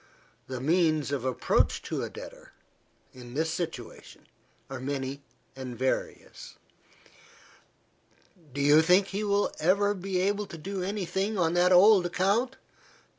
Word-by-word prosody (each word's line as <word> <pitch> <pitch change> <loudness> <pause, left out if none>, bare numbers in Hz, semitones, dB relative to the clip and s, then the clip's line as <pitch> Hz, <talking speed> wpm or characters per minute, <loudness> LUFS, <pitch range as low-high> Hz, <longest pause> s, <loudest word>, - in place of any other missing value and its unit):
The 130 -1 -5
means 155 0 +1
of 140 -4 -2
approach 130 - +1
to - - -3
a - - -4
debtor, - - -11 0.6
in 125 -1 -11
this 160 +2 0
situation, 160 -8 -7 0.4
are 135 -1 -7
many 135 +1 -4 0.3
and 130 -3 -7
various. 130 +2 -4 2.0
"Do 140 +2 -4
you 145 +2 +6
think 185 +4 +3
you 210 +2 -2
will 200 0 +1
ever 200 +5 +2
be 190 -1 -3
able 200 +2 0
to 165 - -9
do 190 +4 -5
any 195 +1 -3
thing 195 +4 -2
on 165 -2 +1
that 175 +1 +3
old 185 0 +6
account?" 205 +9 0
175 Hz, 135 wpm, -28 LUFS, 140-195 Hz, 2.0 s, you